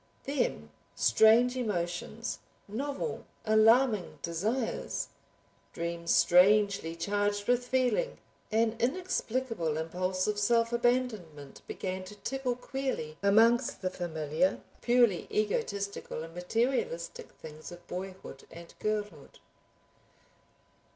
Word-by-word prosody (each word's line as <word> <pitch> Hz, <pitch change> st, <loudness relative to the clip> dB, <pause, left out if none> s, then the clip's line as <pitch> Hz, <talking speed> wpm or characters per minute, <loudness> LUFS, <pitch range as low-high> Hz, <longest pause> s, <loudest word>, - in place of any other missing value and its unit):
Then 245 Hz, -, -2 dB, 0.2 s
strange 225 Hz, -, +5 dB
emotions, 210 Hz, 0 st, -3 dB, 0.3 s
novel 280 Hz, -, -4 dB, 0.2 s
alarming 220 Hz, -1 st, +4 dB
desires, 215 Hz, +9 st, -2 dB, 0.6 s
dreams 170 Hz, 0 st, -3 dB
strangely 195 Hz, -2 st, +4 dB
charged 205 Hz, +3 st, -1 dB
with 245 Hz, 0 st, +2 dB
feeling; 260 Hz, -, +1 dB, 0.3 s
an 225 Hz, +1 st, +2 dB
inexplicable 250 Hz, -, -1 dB
impulse 185 Hz, +3 st, -1 dB
of 210 Hz, -1 st, -1 dB
self 230 Hz, +2 st, +2 dB
abandonment 225 Hz, -, -1 dB
began 185 Hz, -1 st, -4 dB
to 210 Hz, -, -10 dB
tickle 260 Hz, +3 st, -2 dB
queerly 250 Hz, -, -4 dB
amongst 225 Hz, +4 st, +4 dB
the 185 Hz, -, 0 dB
familiar 160 Hz, 0 st, -1 dB, 0.2 s
purely 240 Hz, -6 st, +3 dB
egotistical 200 Hz, -4 st, -2 dB
and 165 Hz, 0 st, -10 dB
materialistic 180 Hz, -2 st, -1 dB
things 155 Hz, +1 st, -10 dB
of 175 Hz, 0 st, -12 dB
boyhood 185 Hz, -6 st, -7 dB
and 170 Hz, 0 st, -12 dB
girlhood. 210 Hz, -9 st, -3 dB
205 Hz, 95 wpm, -30 LUFS, 175-240 Hz, 0.6 s, strange